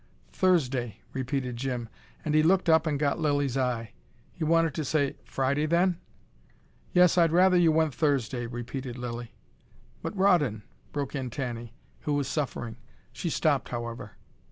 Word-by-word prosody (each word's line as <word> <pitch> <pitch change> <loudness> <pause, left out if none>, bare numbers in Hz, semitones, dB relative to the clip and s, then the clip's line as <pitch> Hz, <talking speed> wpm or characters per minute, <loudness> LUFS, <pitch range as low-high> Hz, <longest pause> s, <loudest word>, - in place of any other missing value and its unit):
"Thursday," 135 - +1 0.2
repeated 130 -1 -2
Jim. 125 -2 -3 0.4
And 155 - 0
he 155 - +5
looked 180 +4 +3
up 160 0 +5
and 150 -2 +1
got 145 +2 0
Lilly's 145 -4 +1
eye. 125 -4 -1 0.4
He 170 - -5
wanted 165 -1 +3
to 155 - -2
say 145 -1 0
"Friday 140 +3 0
then?" 175 +2 +2 0.9
"Yes, 180 0 +5
I'd 165 -2 +4
rather 185 +2 +5
you 170 -2 +5
went 160 -2 +2
Thursday," 130 -5 0
repeated 120 +1 -5
Lilly. 120 -1 -6 0.7
"But 205 - -5
Rawdon 155 - +3
!" - - -34
broke 145 -2 -3
in 135 -3 -3
Tanny, 120 -2 -5 0.2
who 150 - -2
was 140 -2 0
suffering. 125 -6 -3 0.4
She 175 - -3
stopped, 150 -4 +1
however. 120 -3 -5
140 Hz, 155 wpm, -28 LUFS, 125-160 Hz, 0.9 s, he